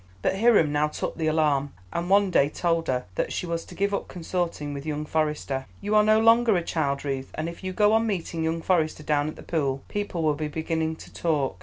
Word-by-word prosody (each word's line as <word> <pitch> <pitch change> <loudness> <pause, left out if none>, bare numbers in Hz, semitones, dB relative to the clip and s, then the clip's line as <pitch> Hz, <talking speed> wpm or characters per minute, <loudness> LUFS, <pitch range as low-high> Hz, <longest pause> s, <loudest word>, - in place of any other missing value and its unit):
But 190 - +1
Hiram 215 -10 +5
now 150 +1 +2
took 150 - -4
the 160 -1 -1
alarm, 150 -3 +1 0.2
and 170 +1 -2
one 200 -1 +4
day 140 -4 +4
told 165 +1 0
her 125 -1 0
that - - -2
she - - -2
was 170 -1 -2
to - - -12
give 200 +1 0
up 200 - -2
consorting 170 -4 -3
with 140 -1 -6
young 150 0 -3
Forester. 150 -4 -1
"You 205 +1 -2
are 210 0 +6
no 215 +1 +5
longer 230 -2 +5
a 175 - -1
child, 140 -4 -1
Ruth, 135 -1 -3
and 155 - -2
if 170 +3 -8
you 185 - -2
go 210 +3 +3
on 225 +1 +3
meeting 170 -5 -2
young 165 0 -1
Forester 160 -4 +1
down 150 -1 +1
at 155 - -5
the - - -11
pool, 140 -5 -1
people 205 -5 -3
will 155 -1 +3
be 150 +1 -3
beginning 160 +1 -2
to - - -13
talk. 145 - -1
160 Hz, 235 wpm, -26 LUFS, 150-185 Hz, 0.2 s, are